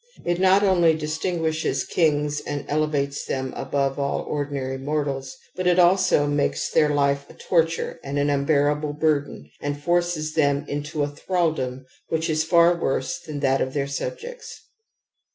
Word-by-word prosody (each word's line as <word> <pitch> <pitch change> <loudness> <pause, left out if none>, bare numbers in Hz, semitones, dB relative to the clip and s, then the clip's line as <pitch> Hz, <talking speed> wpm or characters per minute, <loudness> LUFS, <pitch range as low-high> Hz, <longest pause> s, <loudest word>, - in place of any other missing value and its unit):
It 175 0 0
not 190 +2 +5
only 175 -5 +4
distinguishes 160 +1 -1
kings 150 -3 +1
and 145 -1 -5
elevates 145 -2 -1
them 130 -1 -3
above 135 0 -1
all 140 0 -1
ordinary 140 -2 -3
mortals, 140 -2 -3 0.2
but 185 0 -1
it 180 0 +4
also 180 -4 +4
makes 145 0 0
their 150 -1 +4
life 140 -1 +1
a - - -14
torture 165 -1 0
and 140 +1 -4
an 145 0 +2
unbearable 145 +1 +1
burden 145 - -1
and 145 0 -3
forces 175 -1 0
them 145 -2 +1
into 145 +1 -3
a - - 0
thraldom 145 -5 -2 0.2
which 160 0 0
is 155 0 +1
far 170 +1 +5
worse 170 +1 -1
than 155 -4 -7
that 135 -1 +2
of 130 +2 -2
their 140 -1 0
subjects. 470 - -6
150 Hz, 155 wpm, -24 LUFS, 140-165 Hz, 0.2 s, not